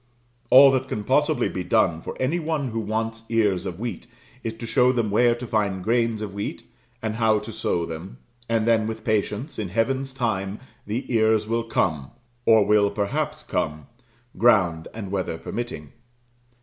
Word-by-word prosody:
All 135 +1 +9
that 130 0 0
can 105 -4 -3
possibly 150 +6 +2
be 90 - -4
done 90 -4 +2
for - - -7
any 140 +7 0
one 155 -4 -2
who 115 0 -3
wants 110 +1 -2
ears 105 -6 +1
of 90 +1 -6
wheat 120 +1 -5 0.4
is 110 0 -3
to 115 - -7
show 125 +2 +3
them 115 -5 -1
where 120 +3 +4
to 120 +1 -7
find 100 -5 -1
grains 115 0 +1
of 100 -2 -6
wheat, 100 +1 -5 0.4
and 110 0 -2
how 110 -2 +3
to 105 +2 -6
sow 85 -5 -1
them, 80 -3 -8 0.3
and 115 -1 +1
then, 110 -2 +3
with 110 0 -5
patience, 110 +5 -1
in 105 -4 -3
Heaven's 130 +7 0
time, 110 -6 -2 0.3
the 115 +5 -2
ears 110 -1 +3
will 115 +1 -1
come 75 -11 0 0.4
or 110 -2 +6
will 105 0 +4
perhaps 100 -1 -2
come 75 0 -2 0.5
ground 90 -9 +3
and 105 -4 -7
weather 95 -4 -2
permitting. 120 +7 -6
110 Hz, 175 wpm, -24 LUFS, 100-120 Hz, 0.5 s, All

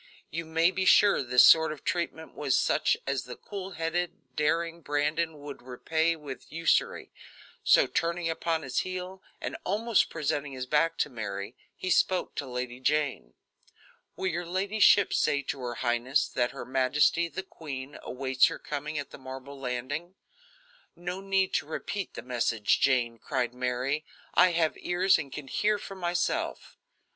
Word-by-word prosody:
You 165 0 -3
may 165 +2 +3
be 190 - -1
sure 200 +2 +6
this 125 -1 +6
sort 160 -1 +7
of 155 - -8
treatment 170 -2 -3
was 140 -3 +1
such - - +2
as 140 -2 -1
the 125 -1 -7
cool 195 -2 -7
headed, 165 -5 -3
daring 165 +2 0
Brandon 150 +2 0
would 145 -1 -8
repay 160 +6 0
with 145 -4 -9
usury; 165 +1 +1 0.5
so, - - +6
turning 170 0 -1
upon 165 0 -1
his 130 -1 -1
heel 185 +1 -5 0.2
and - - -4
almost 215 +3 +2
presenting 145 -3 -2
his 130 -1 -4
back 150 +5 +2
to - - 0
Mary, 100 -1 -5 0.2
he 185 - -2
spoke 185 0 +2
to 145 - -4
Lady 125 0 -4
Jane: 140 - 0 0.8
"Will - - -4
your 175 -1 -1
ladyship 200 +2 +4
say 140 -1 +2
to 135 - -4
her 120 -2 -4
highness 120 +3 +1
that 120 -1 0
her - - -8
majesty, 135 +6 +2
the 170 +4 -5
queen, 140 -6 -8
awaits 130 0 +2
her - - -4
coming 150 +1 -5
at 145 -1 -5
the - - -10
marble 135 +1 -9
landing?" 135 +8 -4 0.8
"No 175 +2 -5
need 195 -1 +1
to 140 - 0
repeat 195 +5 -4
the - - -6
message, 115 -4 +1
Jane," 120 -4 +2
cried 125 -1 -2
Mary. 125 +4 -1 0.3
"I 180 -1 +5
have 165 -2 +2
ears 180 0 +3
and 140 -4 -6
can 145 0 -7
hear 210 +9 +1
for 195 - -8
myself." 175 -2 -2
150 Hz, 160 wpm, -28 LUFS, 130-175 Hz, 0.8 s, sort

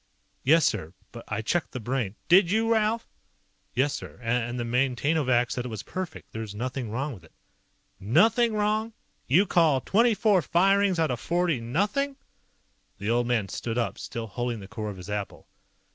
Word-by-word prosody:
"Yes, 160 +2 +5
sir. 95 -5 -1 0.2
But 115 - -10
I 110 - -3
checked 170 +5 -1
the 130 - -4
Brain 120 -3 -2
" - - -43
"Did 175 0 +6
you, 225 +3 +2
Ralph?" 220 +1 +1 0.7
"Yes, 135 +3 +2
sir. 85 -5 -7
And 120 +1 -1
the - - -1
Maintainovac 125 +1 +1
said 125 - -2
it - - -5
was 110 -3 -6
perfect. 185 +8 -6
There's 110 -2 -6
nothing 125 +1 -3
wrong 135 +6 -3
with 95 -7 -13
it." 80 - -19 0.7
"Nothing 225 - +3
wrong? 215 +2 0 0.3
You 170 +11 +5
call 160 -7 +3
twenty 225 - +3
four 205 -4 +3
firings 195 +4 +3
out 160 -4 +1
of 120 - -2
forty 170 -3 0
nothing?" 205 - 0 0.8
The 100 +3 -2
old 120 0 +1
man 115 -5 +1
stood 115 +4 -4
up, 120 - -1
still 115 -1 -5
holding 120 +1 -3
the 95 - -10
core 110 0 -5
of 100 - -7
his 90 - -10
apple. 105 -1 -5
130 Hz, 180 wpm, -27 LUFS, 115-185 Hz, 0.8 s, Did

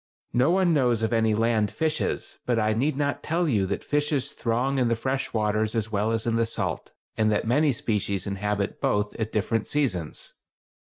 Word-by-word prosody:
No 125 +5 +3
one 180 -1 +3
knows 120 -6 +2
of 110 - 0
any 110 -1 +3
land 110 -1 +2
fishes; 155 0 -2
but 120 -2 +2
I 110 -1 +2
need 135 +5 0
not 145 -1 -1
tell 170 +2 0
you 105 -9 +1
that 100 - -3
fishes 145 -2 0
throng 125 +4 0
in 125 - +2
the 115 - +2
fresh 130 +4 -2
waters 110 0 0
as 110 -1 -1
well 105 +1 0
as 115 -1 -1
in 115 -1 +1
the 115 - +2
salt, - - -3 0.3
and 110 -1 +3
that 105 - 0
many 145 +6 +3
species 100 -5 -1
inhabit 100 0 -2
both 105 0 +1
at 110 -1 -2
different 110 +1 0
seasons. 95 - -2
115 Hz, 195 wpm, -26 LUFS, 105-135 Hz, 0.3 s, No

